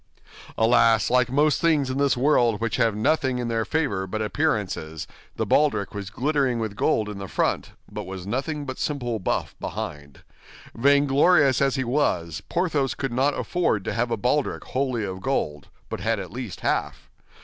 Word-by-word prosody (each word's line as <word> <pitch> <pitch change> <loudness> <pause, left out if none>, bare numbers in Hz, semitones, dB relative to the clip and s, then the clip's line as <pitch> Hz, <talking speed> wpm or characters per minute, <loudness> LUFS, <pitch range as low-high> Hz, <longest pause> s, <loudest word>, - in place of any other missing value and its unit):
Alas, 115 -1 +4
like 125 -1 +3
most 150 +2 +2
things 150 -5 +2
in 130 - -2
this 140 -2 +2
world 120 -5 +3
which 115 -2 -1
have 115 -4 +2
nothing 130 +3 +1
in 120 -1 -2
their 115 -1 0
favor 100 -9 -1
but 110 +3 -3
appearances, 105 - -1 0.3
the - - -1
baldric 145 -10 +2
was 100 -1 -5
glittering 135 +2 0
with 110 -3 -3
gold 110 +1 +1
in 105 -1 -6
the 100 - -6
front, - - -1
but - - -6
was 95 -1 -7
nothing 140 +7 -3
but 130 -1 -6
simple 120 -6 -2
buff 95 - -2
behind. 70 -2 -6 0.5
Vainglorious 140 +2 +4
as 135 -1 +2
he 130 - 0
was, 90 - 0
Porthos 155 -7 0
could 135 -3 -3
not 135 +3 +1
afford 170 - 0
to - - -2
have 120 +1 0
a 115 - -1
baldric 130 +6 0
wholly 130 -4 -1
of 95 -1 -5
gold, 75 - -2 0.2
but - - -5
had - - 0
at - - -7
least - - -6
half. - - -2
125 Hz, 175 wpm, -24 LUFS, 105-140 Hz, 0.5 s, Alas